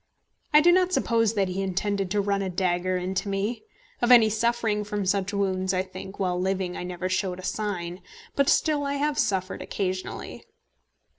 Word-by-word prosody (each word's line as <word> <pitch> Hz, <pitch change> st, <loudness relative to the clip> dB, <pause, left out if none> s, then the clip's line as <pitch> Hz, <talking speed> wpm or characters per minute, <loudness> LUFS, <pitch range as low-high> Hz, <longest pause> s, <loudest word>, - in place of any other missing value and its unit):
I 300 Hz, 0 st, +7 dB
do 350 Hz, +3 st, +6 dB
not 365 Hz, 0 st, +3 dB
suppose 230 Hz, -, +2 dB
that 195 Hz, -2 st, +2 dB
he 185 Hz, +1 st, -3 dB
intended 195 Hz, 0 st, -1 dB
to 205 Hz, +2 st, +1 dB
run 200 Hz, 0 st, 0 dB
a 190 Hz, -, -2 dB
dagger 180 Hz, 0 st, 0 dB
into 190 Hz, +3 st, -2 dB
me. 200 Hz, +4 st, -2 dB, 0.4 s
Of 240 Hz, +1 st, +3 dB
any 225 Hz, -3 st, +7 dB
suffering 225 Hz, -1 st, 0 dB
from 205 Hz, -1 st, -3 dB
such 195 Hz, +1 st, 0 dB
wounds, 190 Hz, -2 st, 0 dB
I 185 Hz, -, +1 dB
think, 190 Hz, +1 st, -9 dB
while 180 Hz, -2 st, -1 dB
living, 190 Hz, -1 st, -1 dB
I -, -, -5 dB
never 180 Hz, 0 st, -4 dB
showed 185 Hz, -1 st, -1 dB
a 185 Hz, -, -9 dB
sign; 185 Hz, -4 st, -3 dB, 0.3 s
but 280 Hz, 0 st, +3 dB
still 300 Hz, -2 st, +2 dB
I 280 Hz, 0 st, -1 dB
have 290 Hz, +1 st, 0 dB
suffered 190 Hz, -3 st, 0 dB
occasionally. 185 Hz, -1 st, -4 dB
195 Hz, 180 wpm, -26 LUFS, 185-220 Hz, 0.4 s, I